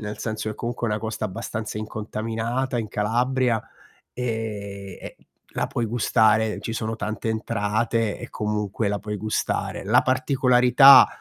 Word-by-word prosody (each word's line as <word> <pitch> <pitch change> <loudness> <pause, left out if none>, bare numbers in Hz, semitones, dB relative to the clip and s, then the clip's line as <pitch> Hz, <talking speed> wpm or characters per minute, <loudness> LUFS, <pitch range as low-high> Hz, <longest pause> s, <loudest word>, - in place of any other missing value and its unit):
nel 105 -1 -6
senso 110 -1 -3
che 105 - -5
comunque 120 0 -3
è - - -2
una 105 - 0
costa 110 -1 -4
abbastanza 105 +3 -5
incontaminata 115 +4 -3
in 110 - -3
Calabria, 120 +2 0 0.5
e 105 -5 -4
e - - -9 0.4
la - - 0
puoi 120 - -2
gustare, 110 -2 +2
ci 115 +2 -5
sono 110 0 -3
tante 110 +1 -3
entrate, 110 0 -1
e - - -8
comunque 105 0 -2
la 100 0 -1
puoi 105 +1 -5
gustare. 110 +2 -2
La 110 +6 +4
particolarità, 130 0 +6
110 Hz, 145 wpm, -24 LUFS, 105-120 Hz, 0.5 s, particolarità